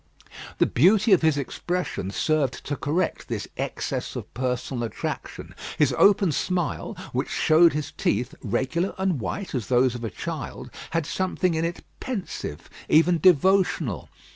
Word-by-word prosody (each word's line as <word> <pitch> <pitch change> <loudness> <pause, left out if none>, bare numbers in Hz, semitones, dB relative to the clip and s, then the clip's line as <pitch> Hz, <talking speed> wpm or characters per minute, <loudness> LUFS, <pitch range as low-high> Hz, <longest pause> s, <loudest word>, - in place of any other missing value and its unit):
The - - +4
beauty 200 - +4
of 185 - +5
his 160 -2 +3
expression 170 - -3
served 145 +4 0
to 145 - -2
correct 155 +7 -1
this - - -4
excess - - -3
of - - -7
personal 125 0 -2
attraction. 115 - -5 0.2
His 140 -3 +3
open 195 +2 +5
smile, 175 +2 -2 0.2
which - - -1
showed 160 +2 +5
his 150 -1 -3
teeth, 120 +5 -1
regular 135 - -1
and 190 -6 0
white 185 - -4
as 125 -6 -2
those 125 0 +3
of 120 -1 -6
a 115 - -2
child, 95 - -6 0.2
had 165 -2 -1
something 185 +1 0
in 160 +1 0
it 170 +1 -4 0.2
pensive, 200 - -5 0.2
even 165 +2 +5
devotional. 180 - +3
155 Hz, 145 wpm, -25 LUFS, 130-180 Hz, 0.2 s, of